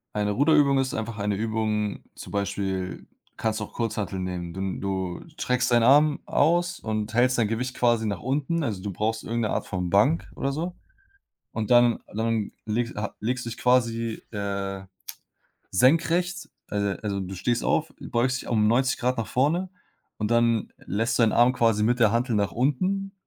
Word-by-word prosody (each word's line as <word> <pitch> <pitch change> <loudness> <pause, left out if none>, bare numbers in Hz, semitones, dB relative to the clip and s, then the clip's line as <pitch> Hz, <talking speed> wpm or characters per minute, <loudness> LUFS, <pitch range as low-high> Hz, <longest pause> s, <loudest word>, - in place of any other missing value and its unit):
Eine 105 0 0
Ruderübung 140 +2 +4
ist 130 -1 -1
einfach 110 0 -4
eine 105 -1 -1
Übung, 110 -1 -1 0.2
zum - - -10
Beispiel 95 -2 -3 0.3
kannst 110 -1 -1
du 105 - -3
auch - - -18
Kurzhanteln 105 -5 -2
nehmen. 90 -2 -4
Dun 95 0 -3
du 95 -2 -3
streckst 125 -6 -1
deinen 120 -1 +5
Arm 145 +4 +5
aus 175 +3 +2
und 110 0 -3
hältst 125 +2 +3
dein 110 -3 +2
Gewicht 125 +3 -2
quasi 120 -2 +2
nach 100 -4 -3
unten. 150 +6 -1
Also, 105 -8 -3
du 100 0 -4
brauchst 110 +3 -2
irgend 115 +1 -1
'ne 110 - 0
Art - - -2
von 90 -2 -2
Bank 110 - +2
oder 135 0 -1
so. 170 +5 -3 0.8
Und 110 -2 -3
dann 120 -1 +5
dann 110 -1 -1
legs 115 +2 -1
ha 105 -1 -4
legst 120 +3 -2
du - - -3
dich 115 - -8
quasi, 115 -2 +1
äh, 100 -2 -3 0.9
senkrechts, 170 - +2 0.2
alo 100 -1 -1
also, 100 -2 -2
du 95 0 -6
stehst 115 +6 -1
auf, - - +1
beugst 125 +2 0
dich - - -11
um 110 -3 +2
90 125 +4 +2
Grad 125 +1 0
nach 115 - -1
vorne 165 +8 +1 0.5
und 105 -1 -2
dann 115 -1 +2
lässt 115 +4 0
du 120 - +4
deinen 110 - +4
Arm 120 +1 +4
quasi 115 -4 +2
mit 120 +3 +2
der 110 -4 +5
Hantel 120 0 +1
nach 100 -1 +1
unten 185 +10 0
115 Hz, 185 wpm, -25 LUFS, 105-130 Hz, 0.9 s, deinen